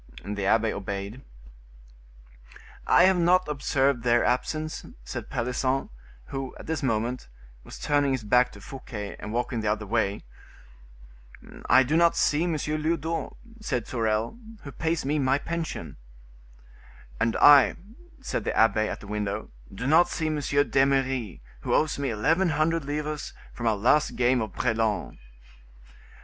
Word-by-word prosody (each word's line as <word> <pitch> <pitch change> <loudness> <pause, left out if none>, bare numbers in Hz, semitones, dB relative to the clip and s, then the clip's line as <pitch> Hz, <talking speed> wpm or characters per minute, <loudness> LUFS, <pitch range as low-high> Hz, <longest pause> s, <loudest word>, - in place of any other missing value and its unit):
The 100 -1 -3
abbe 110 +1 +2
obeyed. 100 +4 -5 1.7
"I - - +6
have 185 -1 +4
not 180 +1 +3
observed 140 -3 0
their 120 0 +3
absence," 155 +5 -1 0.2
said - - -7
Pelisson, 130 - -1 0.4
who, 135 -1 -5
at - - -11
this 160 0 -2
moment, 120 - -1 0.4
was - - -10
turning 145 -1 +1
his 130 -3 -3
back 125 +4 +3
to 100 - -13
Fouquet, 105 -4 -7
and 105 - -7
walking 120 0 -2
the 105 -1 0
other 105 0 -3
way. 105 -1 -1 1.5
"I 130 +1 +7
do 140 +5 -1
not 170 0 +4
see 155 +3 +2
M. 175 - 0
Lyodot," 155 +1 -2 0.3
said 125 - -2
Sorel, 115 - -1 0.2
"who 140 - -8
pays 160 +4 -2
me 150 +2 0
my 135 0 +2
pension." 170 +2 -5 1.2
"And 115 0 +1
I," 145 -3 +7 0.5
said - - -2
the - - -2
abbe, 110 -1 +3
at - - -6
the - - -11
window, 105 0 -3 0.2
"do 95 +6 -6
not 160 +5 +5
see 160 - -3
M. 155 -1 0
d'Eymeris, 135 - +1 0.2
who - - -1
owes 155 -2 +1
me 140 -1 -1
eleven 160 - +1
hundred 160 0 0
livres 150 +1 -4 0.2
from 120 - -3
our 110 -2 +2
last 130 +8 +2
game 125 0 +2
of 110 -3 -4
brelan." 110 -4 -1
130 Hz, 145 wpm, -26 LUFS, 110-150 Hz, 1.7 s, I